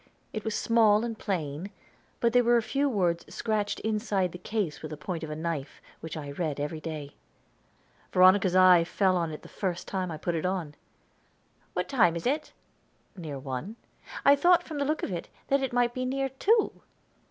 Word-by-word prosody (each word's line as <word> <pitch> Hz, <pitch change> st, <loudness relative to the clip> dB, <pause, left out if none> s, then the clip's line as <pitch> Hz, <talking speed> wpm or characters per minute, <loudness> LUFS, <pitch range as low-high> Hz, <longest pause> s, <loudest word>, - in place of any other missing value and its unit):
It 215 Hz, -, -4 dB
was 220 Hz, -1 st, -2 dB
small 220 Hz, -2 st, +4 dB
and 230 Hz, -1 st, -4 dB
plain, 175 Hz, -4 st, -3 dB, 0.5 s
but 235 Hz, -1 st, +2 dB
there 245 Hz, 0 st, +5 dB
were 240 Hz, 0 st, +4 dB
a 230 Hz, -, +1 dB
few 280 Hz, +4 st, 0 dB
words 175 Hz, -7 st, +1 dB
scratched 215 Hz, -2 st, -1 dB
inside 210 Hz, -4 st, 0 dB
the 180 Hz, -, -9 dB
case 190 Hz, -5 st, -3 dB
with 155 Hz, -, -6 dB
the 155 Hz, -, -6 dB
point 165 Hz, +2 st, -5 dB
of 160 Hz, -, -5 dB
a 150 Hz, -, -4 dB
knife, 160 Hz, -3 st, -4 dB, 0.2 s
which 160 Hz, -1 st, -7 dB
I 145 Hz, -2 st, -6 dB
read 150 Hz, -1 st, -3 dB
every 150 Hz, +2 st, -3 dB
day. 155 Hz, -3 st, -6 dB, 1.0 s
Veronica's 185 Hz, 0 st, +5 dB
eye 185 Hz, -2 st, +7 dB
fell 185 Hz, +2 st, +1 dB
on 170 Hz, -2 st, 0 dB
it 150 Hz, -, -8 dB
the -, -, -11 dB
first 185 Hz, -3 st, -4 dB
time 185 Hz, -2 st, -2 dB
I 160 Hz, -, -5 dB
put 175 Hz, +3 st, -2 dB
it 160 Hz, -, -2 dB
on. 180 Hz, -5 st, -2 dB, 1.0 s
"What -, -, -1 dB
time 195 Hz, -11 st, +3 dB
is 170 Hz, -, -5 dB
it?" 300 Hz, +5 st, -1 dB, 0.6 s
"Near 155 Hz, -7 st, -6 dB
one." 135 Hz, -, -5 dB, 0.5 s
"I 280 Hz, -, +8 dB
thought, 350 Hz, +4 st, +4 dB
from 310 Hz, -4 st, -6 dB
the 280 Hz, -, +1 dB
look 305 Hz, +2 st, -1 dB
of -, -, -2 dB
it, 175 Hz, -2 st, -5 dB, 0.2 s
that 275 Hz, 0 st, +3 dB
it 265 Hz, -, -1 dB
might 240 Hz, 0 st, +2 dB
be 255 Hz, -, -3 dB
near 270 Hz, +1 st, -1 dB
two." 415 Hz, -, +1 dB
185 Hz, 200 wpm, -28 LUFS, 165-235 Hz, 1.0 s, I